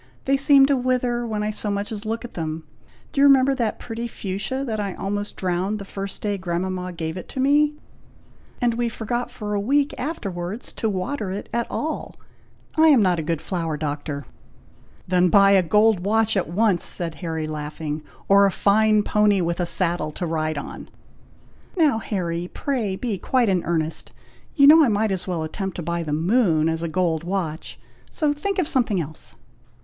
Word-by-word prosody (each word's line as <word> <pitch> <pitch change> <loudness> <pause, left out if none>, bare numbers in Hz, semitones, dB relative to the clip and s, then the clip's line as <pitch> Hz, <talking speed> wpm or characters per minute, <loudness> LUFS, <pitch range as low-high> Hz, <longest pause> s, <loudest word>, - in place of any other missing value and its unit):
They 275 - +3
seem 275 0 +6
to 280 0 +2
wither 250 -2 0
when 215 -2 -2
I 210 - -1
so 210 0 -3
much 200 +1 -2
as 215 0 -5
look 225 +2 -3
at 240 - -10
them. 160 -1 -4 0.5
Do 275 - +1
you 285 - +8
remember 275 0 +5
that 235 -5 -1
pretty 235 0 -5
fuchsia 215 +6 -4
that 220 -4 -3
I 200 -2 -3
almost 205 +1 -3
drowned 185 +3 -1
the 200 - -8
first 195 0 -6
day 205 -2 -1
grandmama 180 +1 -3
gave 165 0 -4
it 185 - -9
me; 290 +3 +3 0.8
and 240 -2 +2
we 235 0 -1
forgot 240 +2 -3
for 210 -4 -5
a 205 - +1
week 280 +7 +1
afterwards 205 - -4
to 220 - -2
water 205 +3 -3
it 195 +2 -5
at 235 0 0
all. 315 +1 -4 0.6
I 320 0 +5
am 275 -8 +6
not 180 -3 +2
a - - 0
good 160 0 -2
flower 165 -4 -2
doctor." 145 -2 -4 0.8
"Then 180 0 +3
buy 195 +2 +6
a 195 -1 +6
gold 210 +3 +3
watch 220 +4 +1
at 190 -5 0
once," 200 0 +2
said 170 -2 -1
Harry, 160 -2 -3
laughing; 150 0 -5 0.3
"or 200 0 +6
a - - 0
fine 215 +2 +3
pony, 210 -2 +3
with 170 0 -1
a 175 - 0
saddle, 170 -4 0
to 175 - -3
ride 155 -2 -1
on." 145 - -7 0.9
"Now, 295 -9 +3
Harry, 175 -5 -3
pray 235 -9 -2
be 210 -2 -3
quite 245 +2 +2
in 185 -3 +1
earnest. 160 -2 -2 0.4
You 280 - +6
know 310 +3 +9
I - - +4
might 215 -1 +1
as 185 -1 -3
well 175 -3 -2
attempt 190 +4 -4
to 175 - -5
buy 170 +1 -2
the 155 -3 -4
moon 165 0 +2
as 165 0 -1
a 170 - -1
gold 165 -1 0
watch; 170 -3 -4 0.3
so 300 -2 0
think 390 +7 -3
of 360 -5 +1
something 240 - +1
else." 155 -1 -7
200 Hz, 190 wpm, -23 LUFS, 170-235 Hz, 0.9 s, know